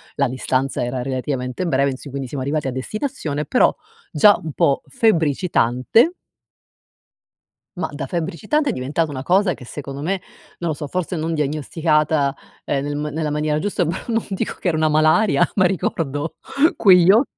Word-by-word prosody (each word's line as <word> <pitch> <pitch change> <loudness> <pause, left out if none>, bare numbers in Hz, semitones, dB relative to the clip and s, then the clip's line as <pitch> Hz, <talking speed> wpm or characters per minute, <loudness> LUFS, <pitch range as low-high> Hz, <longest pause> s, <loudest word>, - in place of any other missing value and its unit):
la 140 - +2
distanza 130 +1 -1
era 125 +1 -2
relativamente 130 +3 -3
breve 140 -4 +2
in 130 - -4
si 140 - -10
quindi 135 -1 -5
siamo 130 0 -4
arrivati 145 0 -1
a - - -1
destinazione, 150 - -3
però - - +3 0.4
già 205 +7 +5
un 160 -2 -6
po' 140 0 +2
febbricitante. 170 - +2 1.6
Ma 165 -3 -2
da 145 -1 -5
febbricitante 195 - -1
è - - +2
diventata 145 +5 -1
una 130 - -5
cosa 185 +3 +3
che 125 - -12
secondo 140 +1 -7
me, 185 +5 -1 0.4
non 170 - -2
lo 155 - -1
so, 150 -1 -6
forse 180 +2 -3
non 160 +1 -2
diagnosticata, 150 -1 +1 0.3
ehm, 135 -1 -1
nel 145 0 -3
ma 150 +1 -2
nella 155 +1 -2
maniera 150 0 0
giusta, 195 0 -1
però 170 +3 -3
non 230 -1 0
dico 195 - -3
che 180 - +1
era 160 - 0
una 155 0 +2
malaria 155 +2 +4
ma 185 - +4
ricordo 165 -4 -2 0.4
quegli 185 -3 +7
o 225 +5 +5
155 Hz, 175 wpm, -21 LUFS, 140-180 Hz, 1.6 s, quegli